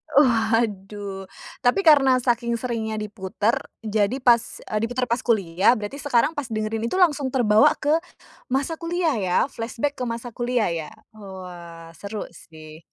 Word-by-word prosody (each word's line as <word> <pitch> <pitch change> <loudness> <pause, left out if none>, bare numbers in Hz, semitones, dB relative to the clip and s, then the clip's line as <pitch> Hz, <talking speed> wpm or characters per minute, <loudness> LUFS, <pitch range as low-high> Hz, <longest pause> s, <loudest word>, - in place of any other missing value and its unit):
Waduh. 210 -6 +1 0.3
Tapi 395 -1 +2
karena 280 -5 +6
saking 235 -1 +1
seringnya 225 -2 -3
diputer, 210 +1 -1 0.2
jadi 220 +4 0
pas 235 -2 +2
eee, 215 - -2
diputer 250 +1 -2
pas 240 0 0
kuliah, 195 0 +2
berarti 215 +6 -6
sekarang, 280 +1 +2
pas 290 -6 -5
dengerin 220 +1 -2
itu - - -3
langsung 300 -7 +3
terbawa 225 -5 +4
ke 295 0 -1 0.6
masa 275 +5 -1
kuliah, 335 -3 0
ya? 180 -2 0
Flashback 245 +5 -3
ke - - -2
masa 235 +1 -5
kuliah, 240 -5 0
ya? 160 -2 -4 0.2
Wah, 180 -5 -10
seru 200 +5 -6
sih. 155 -2 -13
225 Hz, 145 wpm, -23 LUFS, 200-255 Hz, 0.6 s, karena